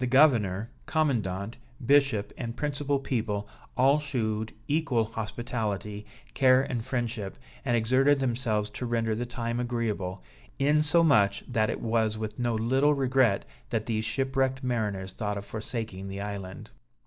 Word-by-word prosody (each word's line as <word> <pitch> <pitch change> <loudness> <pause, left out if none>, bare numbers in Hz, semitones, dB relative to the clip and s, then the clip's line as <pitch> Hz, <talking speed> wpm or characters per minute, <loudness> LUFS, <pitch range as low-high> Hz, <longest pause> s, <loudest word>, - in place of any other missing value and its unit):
The 125 - +1
governor, 120 -6 +4 0.2
commandant, 115 - 0 0.3
bishop 135 -6 +3
and 115 -1 -5
principal 145 -1 0
people, 110 -6 -2 0.3
all 135 +4 +5
shewed 110 -7 -2 0.2
equal 145 -6 +2
hospitality, 110 -2 -4 0.3
care 130 -1 +5
and 120 -4 -3
friendship, 120 -5 -3 0.3
and 120 -3 +2
exerted 130 +5 +3
themselves 115 -5 0
to 125 - -4
render 115 -1 0
the 120 +3 -3
time 120 -1 -3
agreeable; 110 - -2 0.3
insomuch 145 -7 +4
that 110 -4 +1
it - - -3
was 110 -1 +1
with 110 +2 -5
no 120 -2 +1
little 130 +6 +3
regret 130 -6 +2 0.2
that 110 -3 -1
these 110 -2 -1
shipwrecked 135 +2 0
mariners 105 -6 -1
thought 105 -2 -2
of 100 - -6
forsaking 110 -3 -4
the 100 0 -5
island. 100 -2 -6
115 Hz, 135 wpm, -28 LUFS, 105-130 Hz, 0.3 s, all